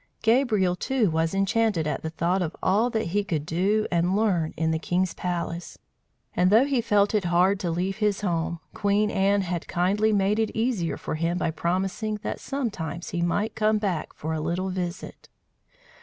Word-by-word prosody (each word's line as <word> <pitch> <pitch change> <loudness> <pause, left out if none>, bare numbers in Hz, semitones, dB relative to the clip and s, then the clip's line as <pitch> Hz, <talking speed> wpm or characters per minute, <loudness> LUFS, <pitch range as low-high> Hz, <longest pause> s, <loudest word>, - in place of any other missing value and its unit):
Gabriel, 220 -6 +3
too, 235 -2 0
was 160 +3 0
enchanted 195 -3 +1
at 150 - -2
the 160 - -3
thought 175 +4 0
of 170 -2 -3
all 215 +6 +3
that 220 -6 -2
he 205 +4 +1
could 160 -7 -2
do 195 +6 +1
and 175 +2 +2
learn 185 -7 +1
in 160 0 +1
the 160 - 0
king's 180 +2 0
palace; 175 -1 -4 0.6
and 180 +1 +3
though 225 +6 +6
he 275 -4 +1
felt 205 -2 +2
it 210 -4 +1
hard 180 +3 +3
to 175 - -2
leave 185 +4 -1
his 210 -2 0
home, 170 -3 -1
Queen 205 +1 +1
Anne 200 +1 +2
had 175 -2 -3
kindly 200 +5 +1
made 205 +1 +2
it 220 - +1
easier 220 -8 0
for - - -5
him 165 +3 -1
by 170 - 0
promising 190 +6 -1
that - - -3
sometimes 195 - -4
he 175 -2 -2
might 205 +6 0
come 215 0 +2
back 190 -7 -2
for 160 +2 -4
a 160 - -2
little 175 +4 -1
visit. 180 -1 -5
190 Hz, 185 wpm, -25 LUFS, 170-210 Hz, 0.6 s, though